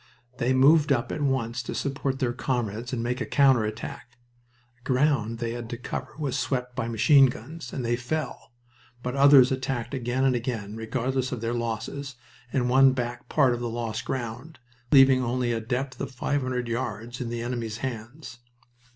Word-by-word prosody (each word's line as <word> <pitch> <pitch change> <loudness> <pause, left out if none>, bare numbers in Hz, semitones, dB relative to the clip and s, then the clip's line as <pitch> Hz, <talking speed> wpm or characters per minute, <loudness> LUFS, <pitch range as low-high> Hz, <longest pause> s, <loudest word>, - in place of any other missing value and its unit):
They 120 +2 +1
moved 145 +3 +5
up 120 -3 +1
at 155 - -3
once 125 -4 0
to - - -6
support 135 -1 -2
their 125 -3 0
comrades 120 -2 -2
and 120 -3 -2
make 125 +1 -2
a - - 0
counter 135 -5 +4
attack. 115 +2 -7 0.6
The - - -34
ground 130 -4 +1
they 115 0 -3
had 120 -1 -6
to 120 - -4
cover 120 - -6
was 145 -5 -2
swept 125 -2 -2
by 135 -3 -2
machine 135 +5 +6
guns, 145 +7 -7
and 130 - -4
many 120 0 0
fell, 130 +1 -4 0.5
but 125 - -2
the 135 - -4
others 140 -2 +7
attacked 130 -2 -2
again 130 0 -1
and 130 -2 +3
again, 115 -4 -3
regardless 125 +3 -2
of 125 - -4
their 115 +1 -1
losses, 120 +4 -4 0.4
and 125 -3 +1
won 130 +1 +6
back 120 -1 -4
part 135 -5 +3
of 120 - -3
the 120 -1 -3
lost 115 -2 -3
ground, 130 +5 -5 0.3
leaving 135 -2 +6
only 120 0 0
a 115 - -2
depth 130 +4 -3
of 140 - -3
five 140 +3 -1
hundred 125 -1 -2
yards 120 0 -4
in 120 - -3
the 115 0 -3
enemy's 120 -3 -3
hands. 120 +1 -7
125 Hz, 185 wpm, -26 LUFS, 120-135 Hz, 0.6 s, others